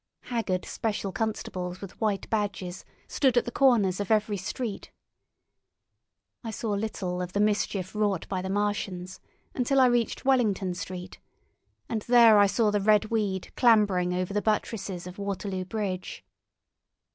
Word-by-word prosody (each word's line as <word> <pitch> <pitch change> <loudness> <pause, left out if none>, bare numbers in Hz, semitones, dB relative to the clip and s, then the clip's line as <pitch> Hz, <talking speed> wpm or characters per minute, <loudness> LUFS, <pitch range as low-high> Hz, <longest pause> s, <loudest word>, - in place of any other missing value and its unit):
Haggard 205 -7 -2
special 205 -3 -3
constables 185 -4 -3
with 195 +2 -10
white 210 -3 0
badges 195 -4 -2 0.2
stood 260 -4 +2
at 240 - +3
the 240 - -4
corners 230 -9 +3
of 205 - -3
every 215 -1 +2
street. 200 +3 -5 1.5
I 225 - -5
saw 220 0 -3
little 200 -3 -2
of 180 0 -5
the 205 - 0
mischief 205 -3 0
wrought 205 -5 0
by 185 -2 -2
the 190 - -4
Martians 195 -3 -2 0.3
until 270 +2 +1
I 260 - +7
reached 240 -1 +1
Wellington 215 -8 +2
Street, 180 0 -7 0.7
and 220 -2 -2
there 235 -3 +7
I 205 - +6
saw 215 +1 +2
the 205 -1 +1
red 215 +1 +3
weed 200 -5 -1
clambering 205 -7 +4
over 180 +2 -2
the 210 - +1
buttresses 200 -4 -2
of 180 +2 -9
Waterloo 195 -1 -3
Bridge. 190 -2 -4
205 Hz, 145 wpm, -27 LUFS, 185-220 Hz, 1.5 s, I